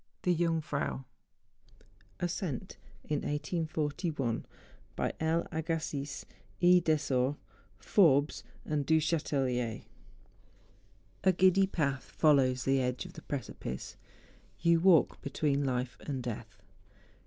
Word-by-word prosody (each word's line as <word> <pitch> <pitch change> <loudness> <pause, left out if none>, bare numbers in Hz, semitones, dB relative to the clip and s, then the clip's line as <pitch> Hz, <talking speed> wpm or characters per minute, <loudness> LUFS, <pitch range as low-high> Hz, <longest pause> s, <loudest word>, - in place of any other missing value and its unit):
THE 180 - +3
JUNGFRAU. 160 -5 -1 1.2
ASCENT 175 - -3 0.3
IN 150 - -1
1841 150 -4 -2 0.5
BY - - -1
L. 160 +1 +1
AGASSIZ, 155 -3 -3 0.3
E. 180 0 +6
DESOR, 145 -5 +1 0.4
FORRES, 150 -7 +3 0.2
AND 150 -2 -1
DU 160 0 +5
CHATELLIER. 135 -7 -1 1.4
A 190 - +6
GIDDY 190 +1 +4
path 140 -8 -1
follows 130 -5 +3
the 135 +1 +2
edge 125 0 -2
of - - -10
the - - -10
precipice; 115 - -5 0.6
you 170 0 +4
walk 175 -3 +4
between 140 0 0
life 125 -2 -2
and 135 -4 -3
death. 110 -4 -7
150 Hz, 100 wpm, -31 LUFS, 130-165 Hz, 1.4 s, E